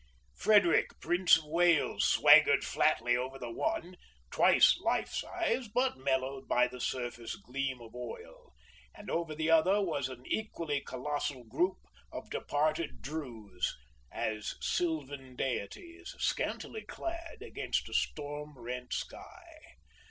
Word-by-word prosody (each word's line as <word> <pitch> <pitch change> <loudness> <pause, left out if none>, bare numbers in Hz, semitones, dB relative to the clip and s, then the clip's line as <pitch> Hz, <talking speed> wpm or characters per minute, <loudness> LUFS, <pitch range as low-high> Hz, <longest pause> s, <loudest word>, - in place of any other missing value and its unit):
Frederick, 200 - +3
Prince 175 -1 +4
of 160 - -7
Wales, 170 0 +3
swaggered - - +6
flatly 120 +1 +2
over 130 +2 -3
the 120 -3 -6
one, 315 - -2 0.4
twice - - +6
life - - 0
size, 265 -9 -1
but 250 +5 +1
mellowed 130 0 -1
by 125 0 +3
the 125 0 -9
surface 120 -2 -3
gleam 130 +4 -4
of 115 -2 -12
oil; 125 -2 -9 0.4
and - - -8
over 165 -2 -2
the 160 +1 0
other 180 +5 +5
was 150 -9 -1
an 125 -1 -10
equally 165 -9 -2
colossal 140 -1 -3
group 150 +12 0 0.3
of - - -8
departed 155 +2 -1
Drews 115 - -4 0.3
as 110 -1 -3
sylvan 145 -6 -2
deities, 335 - -4
scantily 440 - -2
clad, 335 -3 -6
against - - -2
a - - -9
storm 150 -1 -3
rent 125 +1 -6
sky. 345 -2 -7
145 Hz, 125 wpm, -32 LUFS, 125-175 Hz, 0.4 s, swaggered